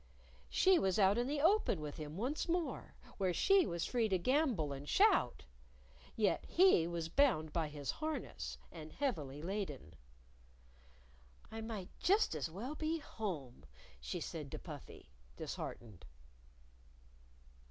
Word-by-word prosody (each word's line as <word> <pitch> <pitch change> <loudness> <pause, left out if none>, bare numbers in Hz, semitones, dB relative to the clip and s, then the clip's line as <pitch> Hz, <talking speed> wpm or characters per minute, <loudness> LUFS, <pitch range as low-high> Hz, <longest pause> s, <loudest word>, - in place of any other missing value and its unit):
She 375 -2 +5
was 190 -1 +1
out 200 +2 +4
in 240 - 0
the 290 +1 -1
open 350 - +3
with 150 -1 -6
him 155 +1 -6
once 265 - -2
more, 340 -1 -2 0.2
where 185 -3 +1
she 390 -3 +5
was 170 -1 -2
free 235 -3 +1
to 190 - +3
gambol 235 - +1
and 140 +1 -7
shout - - +3 0.7
yet 210 -3 +2
he 355 - +5
was 170 -1 -3
bound 165 - +2
by 165 -3 0
his 145 -2 -4
harness 310 0 -4
and 155 -2 -9
heavily 155 - -2
laden. 170 - -4 1.6
"I 225 0 -5
might 220 -5 -5
just 400 - +3
as 155 0 -2
well 220 - -5
be 315 +1 -1
home," 180 - -5 0.4
she 60 0 -4
said - - -5
to - - -3
Puffy, - - -10 0.3
disheartened. 110 -7 -6
195 Hz, 135 wpm, -36 LUFS, -, 1.6 s, She